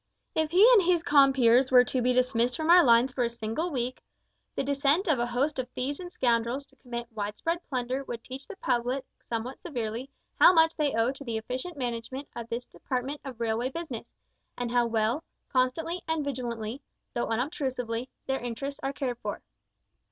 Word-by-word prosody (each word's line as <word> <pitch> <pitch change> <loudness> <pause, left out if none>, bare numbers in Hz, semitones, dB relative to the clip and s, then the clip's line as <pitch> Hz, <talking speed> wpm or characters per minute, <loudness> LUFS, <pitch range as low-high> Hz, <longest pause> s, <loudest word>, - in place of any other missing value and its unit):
If 315 -1 +1
he 375 +7 +7
and 435 - +7
his 345 -2 +2
compeers 265 -4 +5
were 250 -1 +8
to 255 0 -1
be 250 +1 +3
dismissed 250 -1 +2
from 315 +1 +2
our 355 0 +9
lines 240 +1 +5
for 250 - 0
a 235 - +1
single 235 +9 -3
week, 255 -4 -3 0.5
the - - 0
descent 285 +7 +2
of 300 -7 +3
a 240 - +1
host 265 +4 0
of 250 -1 -3
thieves 270 +3 -3
and 355 -1 -7
scoundrels 240 0 0
to - - -25
commit 240 -2 -6
wide 210 -1 -4
spread 335 +1 -1
plunder 255 0 -2
would 235 -2 -6
teach 265 +2 -9
the 425 - -8
public 250 -4 -1 0.2
somewhat 235 +3 -5
severely 245 -4 -4 0.3
how 360 - +9
much 325 -1 +4
they 295 -6 0
owe 230 +2 +2
to 275 +1 -9
the 230 -4 -3
efficient 255 +9 -5
management 250 +2 -4
of 235 -1 -6
this 240 +1 -3
department 265 +3 -4
of 260 -4 -8
railway 230 +2 0
business, 275 -6 -6 0.5
and 245 -1 -3
how 240 -1 +3
well, 230 +6 0 0.3
constantly 285 +7 0
and 320 -2 0
vigilantly 240 -2 -4 0.3
though 240 - -1
unobtrusively 250 -1 -2 0.2
their 265 0 -1
interests 245 +4 -5
are 275 - -2
cared 250 -4 -3
for. - - -5
255 Hz, 190 wpm, -28 LUFS, 235-285 Hz, 0.5 s, our